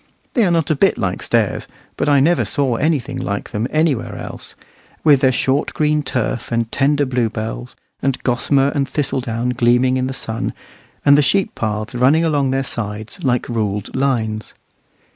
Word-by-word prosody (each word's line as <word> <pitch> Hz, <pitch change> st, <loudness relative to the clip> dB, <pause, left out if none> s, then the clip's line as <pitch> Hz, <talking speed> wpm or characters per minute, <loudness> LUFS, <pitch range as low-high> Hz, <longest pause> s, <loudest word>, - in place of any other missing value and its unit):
They 240 Hz, -, +3 dB
are -, -, +2 dB
not 165 Hz, -3 st, +1 dB
a -, -, +2 dB
bit -, -, +3 dB
like -, -, -2 dB
stairs, -, -, 0 dB, 0.3 s
but -, -, 0 dB
I 140 Hz, -1 st, +5 dB
never 165 Hz, +5 st, +3 dB
saw 140 Hz, -4 st, 0 dB
anything 150 Hz, 0 st, 0 dB
like 100 Hz, 0 st, -4 dB
them 110 Hz, +3 st, -1 dB
anywhere 155 Hz, -5 st, 0 dB
else, -, -, -7 dB, 0.5 s
with 145 Hz, -4 st, +5 dB
their 130 Hz, -, +4 dB
short 135 Hz, +2 st, 0 dB
green 150 Hz, 0 st, +2 dB
turf, 125 Hz, -4 st, -2 dB
and 115 Hz, -1 st, -1 dB
tender 145 Hz, +1 st, +2 dB
bluebells, 110 Hz, -, -3 dB, 0.3 s
and 135 Hz, -1 st, 0 dB
gossamer 135 Hz, +2 st, +2 dB
and 140 Hz, -1 st, -1 dB
thistle 140 Hz, -3 st, -1 dB
down 120 Hz, 0 st, -2 dB
gleaming 125 Hz, +1 st, +3 dB
in 130 Hz, 0 st, 0 dB
the 130 Hz, -, -4 dB
sun 110 Hz, -4 st, -3 dB, 0.5 s
and 140 Hz, 0 st, +7 dB
the 145 Hz, -, +5 dB
sheep 195 Hz, +7 st, +1 dB
paths 110 Hz, +2 st, -3 dB
running 135 Hz, +7 st, +3 dB
along 145 Hz, -4 st, +1 dB
their 135 Hz, +1 st, 0 dB
sides 110 Hz, -3 st, -5 dB
like 125 Hz, -3 st, +1 dB
ruled 105 Hz, -4 st, -2 dB
lines. 115 Hz, -5 st, -1 dB
130 Hz, 175 wpm, -19 LUFS, 115-145 Hz, 0.5 s, and